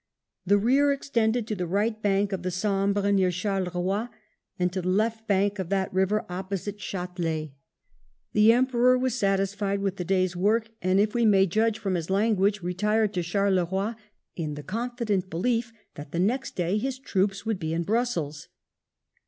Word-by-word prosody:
The 205 Hz, +2 st, +5 dB
rear 270 Hz, +7 st, +3 dB
extended 240 Hz, -4 st, 0 dB
to 215 Hz, -, -3 dB
the 180 Hz, -2 st, -3 dB
right 215 Hz, +5 st, 0 dB
bank 200 Hz, 0 st, +1 dB
of 190 Hz, -, -2 dB
the 185 Hz, -, -2 dB
Sambre 200 Hz, +2 st, 0 dB
near 190 Hz, -2 st, +3 dB
Charleroi 185 Hz, +3 st, -1 dB, 0.5 s
and 180 Hz, 0 st, 0 dB
to 185 Hz, -, -2 dB
the 180 Hz, -, -5 dB
left 220 Hz, +3 st, 0 dB
bank 200 Hz, 0 st, +1 dB
of 185 Hz, -3 st, -3 dB
that 195 Hz, -1 st, -1 dB
river 190 Hz, +4 st, +1 dB
opposite 190 Hz, +2 st, -4 dB
Ch4telet 175 Hz, -6 st, -3 dB, 0.8 s
The 210 Hz, +1 st, +6 dB
Emperor 250 Hz, +1 st, +3 dB
was 255 Hz, -1 st, 0 dB
satisfied 195 Hz, -2 st, 0 dB
with 195 Hz, -1 st, -2 dB
the 180 Hz, -, -2 dB
day's 185 Hz, 0 st, +1 dB
work, 220 Hz, +5 st, +1 dB
and, 185 Hz, +1 st, +2 dB
if 210 Hz, +1 st, +2 dB
we 240 Hz, -, +1 dB
may 195 Hz, -2 st, +5 dB
judge 220 Hz, +4 st, +1 dB
from 195 Hz, -3 st, -2 dB
his 170 Hz, -2 st, -2 dB
language, 200 Hz, -1 st, +2 dB
retired 210 Hz, +4 st, +1 dB
to 180 Hz, -, 0 dB
Charleroi 190 Hz, +2 st, 0 dB, 0.4 s
in 155 Hz, -4 st, -3 dB
the 145 Hz, -, -8 dB
confident 220 Hz, -, -2 dB
belief 230 Hz, +7 st, -1 dB, 0.2 s
that 145 Hz, -1 st, -10 dB
the 170 Hz, -, -2 dB
next 245 Hz, +9 st, 0 dB
day 180 Hz, +4 st, 0 dB
his 260 Hz, +3 st, -3 dB
troops 200 Hz, -6 st, -1 dB
would 220 Hz, -4 st, -1 dB
be 160 Hz, -3 st, -3 dB
in 165 Hz, +1 st, -1 dB
Brussels. 175 Hz, -9 st, -1 dB
200 Hz, 170 wpm, -26 LUFS, 185-220 Hz, 0.8 s, The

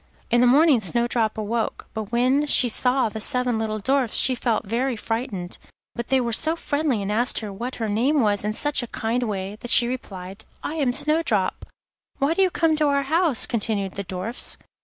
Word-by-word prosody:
In 240 Hz, +1 st, +4 dB
the 250 Hz, -, +5 dB
morning 285 Hz, +1 st, +5 dB
Snowdrop 230 Hz, +1 st, 0 dB
awoke, 220 Hz, +1 st, -3 dB
but 220 Hz, -1 st, -6 dB
when 255 Hz, +5 st, +2 dB
she 255 Hz, -, +4 dB
saw 250 Hz, +2 st, +2 dB
the 220 Hz, 0 st, -6 dB
seven 250 Hz, 0 st, +1 dB
little 215 Hz, -1 st, -2 dB
Dwarfs 260 Hz, +2 st, 0 dB
she 260 Hz, -, +4 dB
felt 235 Hz, -3 st, -1 dB
very 240 Hz, +5 st, -1 dB
frightened. 220 Hz, -5 st, -5 dB, 0.3 s
But 235 Hz, -1 st, -5 dB
they 265 Hz, -, +2 dB
were 235 Hz, -2 st, -2 dB
so 315 Hz, +8 st, +1 dB
friendly 285 Hz, -9 st, -1 dB
and 200 Hz, -, -3 dB
asked 240 Hz, +5 st, +1 dB
her 210 Hz, -2 st, -6 dB
what 240 Hz, +6 st, -5 dB
her 225 Hz, -, -3 dB
name 245 Hz, +9 st, +1 dB
was 205 Hz, -3 st, +1 dB
in 210 Hz, +1 st, -2 dB
such 290 Hz, +5 st, +1 dB
a 240 Hz, -, -6 dB
kind 240 Hz, 0 st, -2 dB
way, 200 Hz, -3 st, -4 dB
that 240 Hz, -, -7 dB
she 240 Hz, -1 st, +6 dB
replied: 195 Hz, -5 st, -7 dB, 0.2 s
'I -, -, -3 dB
am 275 Hz, -5 st, +1 dB
Snowdrop.' 290 Hz, -, +1 dB, 0.5 s
'Why 280 Hz, +4 st, +1 dB
did 390 Hz, -, 0 dB
you 380 Hz, -, +4 dB
come 325 Hz, -2 st, +1 dB
to 300 Hz, -1 st, +2 dB
our 280 Hz, -1 st, +1 dB
house?' 315 Hz, -1 st, +2 dB
continued 210 Hz, -4 st, -2 dB
the 200 Hz, -, -4 dB
Dwarfs. 190 Hz, +5 st, -5 dB
240 Hz, 200 wpm, -23 LUFS, 215-270 Hz, 0.5 s, she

